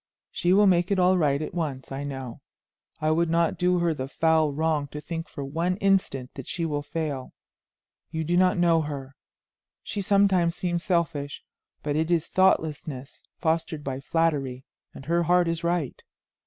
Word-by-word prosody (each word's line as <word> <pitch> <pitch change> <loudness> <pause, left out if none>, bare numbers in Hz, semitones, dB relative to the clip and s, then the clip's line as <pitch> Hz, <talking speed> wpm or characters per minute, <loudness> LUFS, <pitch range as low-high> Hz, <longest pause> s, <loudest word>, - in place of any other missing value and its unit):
She 175 - 0
will 205 +2 +6
make 175 -2 +3
it 200 - +2
all 185 0 +4
right 145 -5 +2
at 155 - -5
once, 145 -7 -3
I 135 +1 -4
know. 135 -4 -6 0.6
I 155 0 +1
would 170 +1 +2
not 165 0 +1
do 180 0 +3
her 170 -1 +2
the 130 -3 -4
foul 160 +1 +2
wrong 155 0 0
to 150 - -7
think 165 +1 -5
for 140 - -6
one 170 +6 -1
instant 190 -11 +1
that 135 - -9
she 170 - -2
will 145 -2 -1
fail. 145 -4 -4 0.8
You 160 0 -3
do 170 +3 0
not 180 0 +4
know 170 -2 +4
her; 140 -3 -6 0.7
she 205 - -3
sometimes 190 -4 +3
seems 175 -1 -1
selfish, 155 -5 -1 0.4
but 145 -1 -1
it 160 +2 0
is 170 -1 +1
thoughtlessness 155 -7 0 0.2
fostered 160 -2 -1
by 135 -1 -3
flattery, 140 -5 0 0.3
and 135 - -11
her 170 +2 +2
heart 175 +1 +3
is 165 0 -2
right. 170 -5 -1
160 Hz, 175 wpm, -26 LUFS, 145-175 Hz, 0.8 s, will